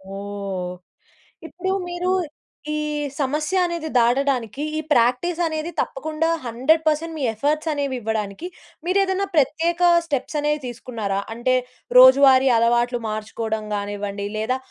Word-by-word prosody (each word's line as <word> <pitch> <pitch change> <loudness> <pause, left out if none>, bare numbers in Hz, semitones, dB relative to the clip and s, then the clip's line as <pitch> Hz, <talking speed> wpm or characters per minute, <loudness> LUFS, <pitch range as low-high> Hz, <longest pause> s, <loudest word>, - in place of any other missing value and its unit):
ఓహ్! 195 -2 -5 0.7
ఇప్పుడు 360 +4 -4 0.2
మీరు 350 +1 -1 0.6
ఈ - - -1 0.4
సమస్య 300 +6 0
అనేది 340 -2 -3
దాటడానికి 250 +1 +1
ఈ - - 0
ప్రాక్టీస్ 250 +9 +2
అనేది 315 +1 -3
తప్పకుండా 310 +3 -2 0.2
100% 310 +6 +1
మీ 290 - -3
ఎఫర్ట్‌స్ 300 +7 -1
అనేవి 280 -2 -2
ఇవ్వడానికి 215 - -3 0.4
మీరు 365 +2 +1
ఏదైనా 385 +1 -1
ప్రత్యేక 325 +4 +1 0.3
స్టెప్స్ 295 0 -2
అనేవి 300 +1 0
తీసుకున్నారా? 225 -5 -4
అంటే 240 +3 +1 0.4
రోజువారీ 260 +1 +8
అలవాట్లు 240 +1 +2
మార్చుకోవడం 215 0 -4
గానివ్వండి 205 0 -4
లేదా 220 +4 0
265 Hz, 115 wpm, -22 LUFS, 225-315 Hz, 0.7 s, రోజువారీ